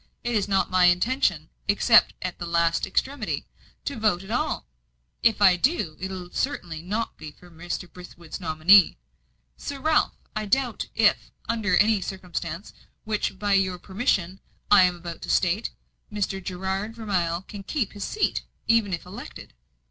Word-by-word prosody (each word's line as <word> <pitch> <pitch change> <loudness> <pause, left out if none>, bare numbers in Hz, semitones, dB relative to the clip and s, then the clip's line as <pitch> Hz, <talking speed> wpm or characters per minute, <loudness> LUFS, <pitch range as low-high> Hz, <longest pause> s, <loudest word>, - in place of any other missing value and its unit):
It 240 - -1
is 205 -3 +1
not 195 -1 +1
my 185 -1 +5
intention, 180 - +2 0.2
except 215 +3 +5
at 180 -1 -4
the 175 - -5
last 170 0 +1
extremity, 255 +5 -2 0.4
to 280 -5 -3
vote 205 -4 +1
at 195 - -9
all. 240 - -1 0.6
If 220 -3 +3
I 185 -2 +7
do, 200 - +1
it 190 - -4
will 180 -2 -7
certainly 175 - -3
not 210 +6 -3
be 155 - -8
for 175 +4 -17
Mr. 175 +2 -5
Brithwood's 175 -1 -10
nominee. 170 - +5 0.6
Sir 280 - -6
Ralph, 310 +2 +2 0.2
I 215 0 -2
doubt 245 +1 0
if, 215 -2 +3 0.2
under 210 -6 +1
some 215 -1 +4
circumstances, 180 -1 -5 0.3
which 210 -3 -2
by 205 0 0
your 190 -2 +2
permission 190 -1 -1 0.3
I 200 -3 +8
am 180 -1 0
about 170 -1 -8
to - - -7
state, 185 +5 +1 0.4
Mr. 195 -2 -2
Gerard 190 +4 -3
Vermilye 180 -6 -1
can 205 - -8
keep 230 +1 -2
his 205 -1 -6
seat, 430 - 0 0.3
even 225 -4 +3
if 165 - -13
elected." - - -10
195 Hz, 160 wpm, -25 LUFS, 175-220 Hz, 0.6 s, I